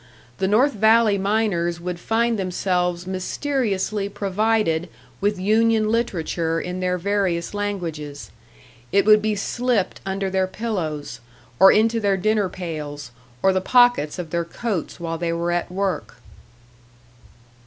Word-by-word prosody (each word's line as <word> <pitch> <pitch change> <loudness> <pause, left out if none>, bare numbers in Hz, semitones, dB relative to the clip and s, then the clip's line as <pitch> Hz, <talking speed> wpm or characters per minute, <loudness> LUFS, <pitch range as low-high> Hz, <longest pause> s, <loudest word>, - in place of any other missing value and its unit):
The 190 - +1
North 245 +8 +3
Valley 220 -1 +4
miners 190 -5 0
would 175 0 -5
find 230 +2 0
themselves 180 -1 -1
mysteriously 200 0 -2
provided 200 -4 0 0.3
with 205 0 0
union 220 +2 +2
literature 170 -7 -1
in 180 +1 -4
their 180 0 0
various 190 -2 -1
languages; 160 - -4 0.6
it 200 -1 +3
would 215 0 +6
be 215 0 0
slipped 240 0 -1
under 195 0 -2
their 190 0 +1
pillows, 185 -8 -4 0.4
or 195 - +9
into 225 +2 +3
their 200 -3 +1
dinner 210 0 +1
pails, 150 -7 -6 0.3
or 190 - +4
the 185 - +1
pockets 245 - +3
of 170 -3 -6
their 170 0 0
coats 185 0 -4
while 165 -1 -4
they 170 -1 -1
were 170 +1 -1
at 175 0 -1
work. 195 -4 -2
190 Hz, 130 wpm, -22 LUFS, 175-215 Hz, 0.6 s, or